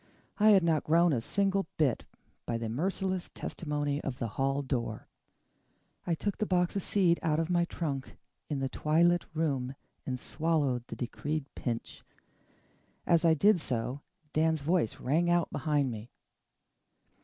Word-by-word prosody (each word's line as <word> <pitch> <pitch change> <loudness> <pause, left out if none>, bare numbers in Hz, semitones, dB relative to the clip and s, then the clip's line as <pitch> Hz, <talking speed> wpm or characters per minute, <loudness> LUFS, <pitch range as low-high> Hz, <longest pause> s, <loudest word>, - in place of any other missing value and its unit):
I 215 +1 +6
had 195 -4 +6
not 160 -3 +2
grown 170 +1 +4
a 120 - 0
single 195 - +1
bit, 140 -7 +1 0.4
by 115 - 0
the 115 -1 -3
merciless 185 - -1
testimony 145 -2 -2
of 130 -3 -3
the 115 -3 -3
hall 135 +5 0
door. 120 -5 -3 1.0
I 170 - +2
took 205 +4 -3
the 215 - 0
box 180 -1 +1
of 195 - 0
seed 180 -3 +2
out 155 -1 +1
of 165 +2 -1
my 175 -1 +3
trunk 145 -6 -4 0.3
in 145 -3 -2
the 135 - 0
twilit 170 +5 +2
room 135 -5 -1 0.3
and 130 -1 -2
swallowed 145 -7 0
the - - -6
decreed 145 +4 -3
pinch. 120 -2 -4 1.0
As 170 -1 +3
I 165 -1 +5
did 200 +3 +4
so, 125 +1 -3 0.3
Dan's 160 -1 +2
voice 160 -7 +1
rang 165 +7 +1
out 175 -1 +2
behind 145 -4 0
me. 110 +1 -7
155 Hz, 155 wpm, -30 LUFS, 135-175 Hz, 1.0 s, I